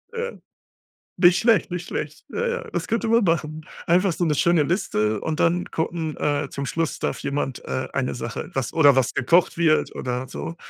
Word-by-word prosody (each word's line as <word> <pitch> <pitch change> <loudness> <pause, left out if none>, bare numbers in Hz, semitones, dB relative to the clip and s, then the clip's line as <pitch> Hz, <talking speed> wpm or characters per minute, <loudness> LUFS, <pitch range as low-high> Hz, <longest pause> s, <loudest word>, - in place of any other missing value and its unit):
Ja. 475 +1 -2 0.9
Nicht 175 0 +5
schlecht, 225 -8 +3
nicht 175 0 -4
schlecht. - - -5
Ja, 470 +1 -2
ja, 480 0 -2
das - - -2
könnte 230 0 0
man 230 +1 +4
machen. 155 -3 -1 0.2
Einfach 180 +2 +3
so 175 - -1
'ne 155 -3 +1
schöne 170 0 +3
Liste 110 - 0
und 160 -1 -3
dann 175 +1 +2
gucken 160 -1 -2
äh, 145 -1 -1
zum 140 0 -4
Schluss 160 -1 -2
darf - - -2
jemand, 135 -2 -3
äh, 130 - -2
eine 130 -2 -1
Sache, 115 -1 -5
was 135 -2 -2
oder 145 -4 +5
was 130 -2 +1
gekocht 170 +8 +3
wird 160 -2 +2
oder 125 +1 -3
so. 165 +5 -6
160 Hz, 190 wpm, -23 LUFS, 140-180 Hz, 0.9 s, Nicht